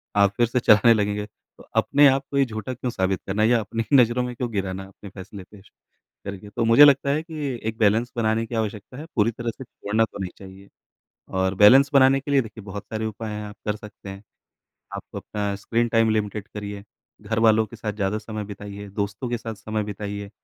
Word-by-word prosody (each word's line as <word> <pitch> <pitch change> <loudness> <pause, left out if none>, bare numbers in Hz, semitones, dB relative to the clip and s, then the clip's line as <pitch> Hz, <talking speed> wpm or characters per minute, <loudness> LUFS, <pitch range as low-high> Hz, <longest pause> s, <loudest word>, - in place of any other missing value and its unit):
आप 100 -1 +4
फिर 120 -1 +3
से 125 +2 0
चलाने 115 +1 +6
लगेंगे। 105 -1 -1
तो 105 - -21
अपने 145 0 +5
आप 135 +1 +2
को 140 - -1
ही 135 - +4
झूठा 110 +2 -5
क्यों 125 0 -4
साबित 95 -3 -1
करना, 100 +3 0
या 115 +1 +4
अपनी 115 +1 -3
ही 140 - +7
नज़रों 125 0 +3
में 125 -1 -5
क्यों 120 0 -3
गिराना 95 -1 -3
अपने 100 +1 -13
फैसले 95 +1 -10
पे 105 -2 -14
श - - -22 0.6
करके। 100 +1 -7
तो 115 +3 -2
मुझे 115 +6 +8
लगता 140 0 +4
है 150 +2 +1
कि 150 -7 -5
एक 110 - -7
बैलेंस 115 +2 +2
बनाने 110 0 +1
की 115 - -6
आवश्यकता 110 +2 -4
है, 155 - -7
पूरी 115 +1 +3
तरह 120 +1 -4
से - - -7
छोड़ना 110 -2 -1
तो 100 - -12
नहीं 90 -2 -4
चाहिए। 95 0 -13 0.7
और 95 0 +1
बैलेंस 130 +8 +7
बनाने 135 0 +6
के 140 +1 -6
लिए 140 - +4
देखिए 110 -2 -10
बहुत 100 0 -7
सारे 110 0 -4
उपाय 110 0 -5
हैं, 105 0 -5
आप 105 - -9
कर 105 - 0
सकते 105 -2 -11
हैं। 95 +2 -9 0.7
आप - - -5
अपना 105 -1 -3
स्क्रीन 115 +4 0
टाइम 115 -1 +3
लिमिटेड 105 0 -2
करिए, 100 -1 -6 0.4
घरवालों 110 0 +3
के 115 - -12
साथ 105 -1 -4
ज़्यादा 105 0 -1
समय 110 -1 -6
बिताइए, 100 0 -8
दोस्तों 100 +4 -4
के 120 0 -2
साथ 115 -1 -6
समय 110 0 -3
बिताइए। 100 -1 -6
110 Hz, 220 wpm, -24 LUFS, 100-120 Hz, 0.7 s, मुझे